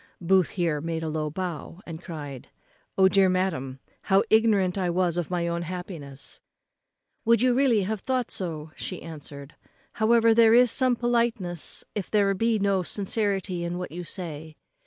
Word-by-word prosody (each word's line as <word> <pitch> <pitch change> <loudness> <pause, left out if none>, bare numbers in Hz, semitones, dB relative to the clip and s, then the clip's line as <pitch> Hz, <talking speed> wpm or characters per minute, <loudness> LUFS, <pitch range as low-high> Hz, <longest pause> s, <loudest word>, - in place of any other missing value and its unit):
Booth 185 0 +3
here 165 -4 0
made 165 0 -3
a - - -2
low 155 -1 -2
bow, 170 0 -5
and 165 -1 -8
cried, 145 -7 -8 0.5
"O 190 0 +6
dear 190 0 +4
madam, 165 -9 -1 0.3
how 195 0 +4
ignorant 215 -5 +3
was 180 -2 0
I 175 - +1
of 165 - -9
my 175 -1 -1
own 170 0 -2
happiness!" 170 -6 -8 0.8
"Would 230 +1 +3
you 255 -1 +4
really 245 -5 +3
have 215 +2 -2
thought 255 +2 -1
so?" 160 -4 -4 0.3
answered 145 -2 -10
she. - - -32 0.3
"However, 230 +1 +5
there 225 0 +6
is 245 -1 +5
some 255 -2 +2
politeness 230 - -1
if 205 -3 -4
there 200 -2 +3
be 225 +3 +1
no 200 -2 +1
sincerity 195 -2 -2
in 170 +1 -3
what 180 - -5
you 175 +2 -6
say." 160 -3 -7
185 Hz, 165 wpm, -26 LUFS, 165-215 Hz, 0.8 s, O